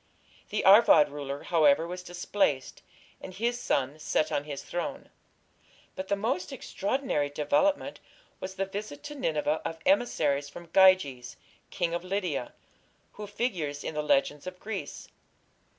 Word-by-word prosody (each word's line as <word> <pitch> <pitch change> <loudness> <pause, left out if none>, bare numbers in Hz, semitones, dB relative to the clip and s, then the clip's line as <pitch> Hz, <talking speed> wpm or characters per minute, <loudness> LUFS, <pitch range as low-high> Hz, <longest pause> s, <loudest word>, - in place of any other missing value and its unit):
The - - -1
Arvad 195 -7 +7
ruler, 140 -1 -6
however, 160 -2 +4
was 180 +1 -6
displaced, 175 -5 -1 0.4
and 185 - -9
his 240 +4 -1
son 140 - -1
set 155 - 0
on 145 - -1
his 145 -2 -6
throne. 175 0 -5 0.8
But 190 - -5
the 200 - +1
most 200 -1 -2
extraordinary 245 - -2
development 150 - +1 0.4
was 190 0 -6
the 195 +1 -1
visit 195 -5 -7
to 295 - -7
Nineveh 155 - -1
of 165 - -4
emissaries 150 - +2
from 170 +3 -12
Gyges, 185 -10 +4 0.3
king 175 -2 -2
of 175 - -2
Lydia, 180 -9 -3 0.6
who 210 0 -8
figures 175 - -3
in - - -4
the 150 - -1
legends 145 +1 +1
of 180 0 -7
Greece. 210 -2 -6
175 Hz, 140 wpm, -28 LUFS, 145-200 Hz, 0.8 s, Arvad